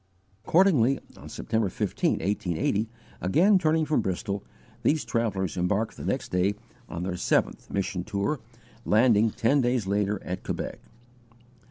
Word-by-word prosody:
Accordingly 150 -8 +4 0.2
on - - -11
September 110 -3 -1
15, - - 0
1880, 100 +3 -1 0.3
again 180 - +4
turning 160 -2 +2
from 150 0 +1
Bristol, 100 +2 -3 0.4
these 155 0 +1
travellers 100 -6 -1
embarked 100 +5 0
the - - -9
next - - -2
day 90 +3 +2 0.3
on 85 +1 -4
their 90 0 -2
seventh - - 0
mission 95 -2 -2
tour, 110 +8 -1 0.4
landing, 110 -1 +4
ten 125 +5 +2
days 120 -3 +1
later, 100 +1 0
at 90 +1 -4
Quebec. - - -4
105 Hz, 135 wpm, -27 LUFS, 95-130 Hz, 0.4 s, Accordingly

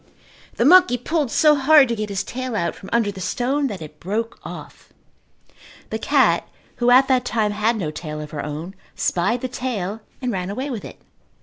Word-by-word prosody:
The 235 - +1
monkey 360 -4 +6
pulled 295 +2 -1
so 305 +5 +5
hard 290 0 +6
to 235 - 0
get 215 -1 -4
his 195 -1 -2
tail 255 -1 -5
out 170 -5 -1
from 195 - -12
under 230 -3 +2
the 190 -1 -9
stone 275 +8 0
that 195 -9 -6
it 150 0 -12
broke 220 +5 -3
off. - - -10 1.0
The - - -2
cat, - - +2 0.3
who 240 0 +2
at 260 +2 +6
that 255 -2 +2
time 220 -4 0
had 215 +3 +1
no 165 -7 -3
tail 155 -1 -6
of 150 0 -8
her 145 -2 -4
own, 155 +5 -6 0.2
spied 230 +8 0
the 255 - -2
tail 225 -5 -4 0.2
and 250 -2 -2
ran 185 -3 -3
away 260 +8 -4
with 225 -5 -5
it. - - -10
230 Hz, 200 wpm, -21 LUFS, 190-255 Hz, 1.0 s, monkey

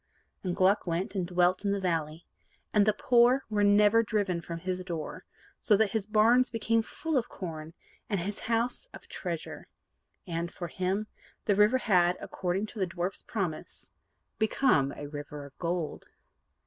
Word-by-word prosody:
And 180 -2 -2
Gluck 190 +1 +3
went, 170 +4 -1
and 185 -4 -1
dwelt 180 +1 +2
in 200 - +1
the 200 - 0
valley, 165 -3 -2 0.5
and 210 -1 +4
the - - +6
poor 245 +4 +4
were 205 -1 +2
never 205 +2 +5
driven 200 -6 -1
from 170 0 -6
his 185 +2 -3
door: 170 -4 -6 0.3
so 210 - +4
that 215 -1 +2
his 215 -3 -2
barns 230 +4 +4
became 230 0 +1
full 315 +6 -3
of 240 - -6
corn, 160 -2 -7 0.3
and 200 -4 0
his 200 +4 -4
house 235 - -1
of - - -13
treasure. - - -6 0.6
And, 170 -1 -3
for 175 -2 -6
him, 190 +4 -1 0.4
the 205 - +3
river 210 +5 +5
had, 180 -7 +3
according 190 +2 -2
to 220 - -8
the 190 - +1
dwarf's 180 +1 -3
promise, 180 -8 -5 0.5
become 220 - +3
a 145 - -7
River 145 0 -7
of 140 - -14
Gold. 170 -2 -3
190 Hz, 165 wpm, -29 LUFS, 175-215 Hz, 0.6 s, the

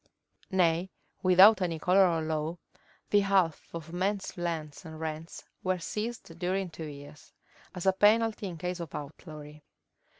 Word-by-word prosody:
Nay, 180 -1 +2 0.3
without 190 +3 +7
any 170 -3 -1
color 185 +4 +4
of 165 -2 0
law, 155 +1 -2 0.5
the 205 - +6
half 195 -5 +1
of 165 0 -8
men's 195 +2 -1
lands 165 -3 -4
and 160 -2 -9
rents 160 +1 -6 0.2
were 185 0 +1
seized 210 -1 -5
during 185 0 -1
two 160 -1 -7
years, 145 0 -12 0.4
as 180 - -5
a 190 - +5
penalty 215 +1 +3
in 175 -3 -6
case 180 +2 -4
of 165 -4 -7
outlawry. 150 0 -9
175 Hz, 145 wpm, -29 LUFS, 160-190 Hz, 0.5 s, without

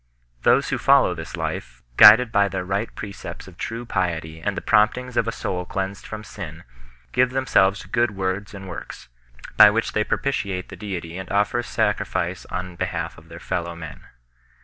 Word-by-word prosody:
Those - - +3
who - - -1
follow - - +5
this - - -7
life, 60 0 -5
guided 110 - +9
by 100 -3 +3
the 95 -1 -3
right 100 +4 -1
pre 105 - -6
cepts - - -9
of - - -13
true 115 +2 -5
piety 85 -6 -2
and 100 +3 -2
the - - -2
promptings 120 +3 +2
of 115 - +1
a - - 0
soul 90 -4 -3
cleansed 95 +1 -4
from 110 0 -7
sin, - - -8 0.5
give 130 - +3
themselves 125 -7 +2
to - - -13
good 120 +1 +1
wftrds 95 0 -3
and 95 -1 -9
works, 90 -7 -9 0.5
by 105 - +10
which 115 +2 -1
they 105 - +2
propitiate 100 -9 -2
the - - -8
Deity 90 -4 -6
and 95 - -8
offer 105 +4 +1
sacrifice 100 -6 -1
on 90 -1 -5
behalf 85 -3 -3
of 80 +1 -20
their 85 - -10
fellow 85 -2 -3
men. 80 -3 -9
95 Hz, 185 wpm, -23 LUFS, 90-110 Hz, 0.5 s, by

